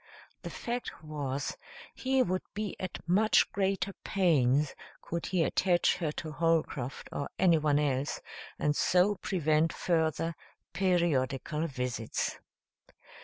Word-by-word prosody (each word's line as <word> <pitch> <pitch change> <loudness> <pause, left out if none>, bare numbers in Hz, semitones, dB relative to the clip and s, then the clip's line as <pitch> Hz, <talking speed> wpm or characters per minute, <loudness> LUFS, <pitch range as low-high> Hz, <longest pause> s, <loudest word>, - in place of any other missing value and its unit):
The - - -6
fact 240 -8 -5
was, 145 -3 -3 0.4
he 265 0 +2
would 185 -2 -1
be 210 -1 -3
at 185 -2 -6
much 210 +5 +4
greater 195 0 0
pains 150 - +2 0.3
could 170 0 -4
he 180 -3 +2
attach 175 +1 +2
her 165 -4 -1
to 155 0 -5
Holcroft 155 -5 0
or 140 - -3
anyone 155 -5 +4
else 145 -1 0 0.4
and 150 0 +1
so 185 +6 +3
prevent 160 -3 +2
further 165 -1 0 0.4
periodical 165 -4 +1
visits. 125 -5 -3
165 Hz, 115 wpm, -30 LUFS, 145-185 Hz, 0.4 s, much